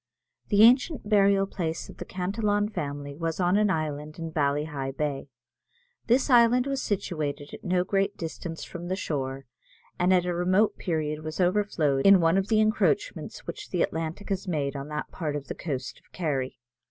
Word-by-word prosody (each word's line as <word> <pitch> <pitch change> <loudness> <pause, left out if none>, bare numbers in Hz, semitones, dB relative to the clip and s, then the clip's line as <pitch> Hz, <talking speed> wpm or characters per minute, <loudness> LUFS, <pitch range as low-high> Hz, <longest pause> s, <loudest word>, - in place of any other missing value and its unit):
The 205 0 +5
ancient 255 +2 +4
burial 200 -2 +4
place 165 -4 -4
of - - -12
the - - -6
Cantillon 205 +3 0
family 145 -6 -5
was 165 +2 -3
on 180 +1 +3
an 210 0 +3
island 155 -3 -3
in 165 -1 -5
Ballyheigh 145 -2 -1
Bay. 145 -2 -2 0.8
This 245 +3 +3
island 245 -1 +5
was 275 -1 -1
situated 150 -8 -3
at - - -9
no 180 -1 +1
great 195 +1 0
distance 165 0 -6
from 175 0 -7
the 185 - -1
shore, 135 -6 -3 0.5
and 180 +1 +3
at 180 -1 +4
a 180 - -1
remote 185 +5 +2
period 155 -3 -2
was 155 +2 -6
overflowed 175 -7 +2
in 195 -1 +8
one 165 +3 +3
of 195 - -2
the 220 -1 +3
encroachments 220 - 0
which - - -7
the 180 - +1
Atlantic 165 +6 -4
has 195 -1 -2
made 145 -5 -1
on 140 0 -5
that 150 0 -5
part 155 -4 -3
of 140 -3 -6
the - - -2
coast 135 -6 -5
of - - -32
Kerry. 140 -7 -2
175 Hz, 180 wpm, -27 LUFS, 150-200 Hz, 0.8 s, in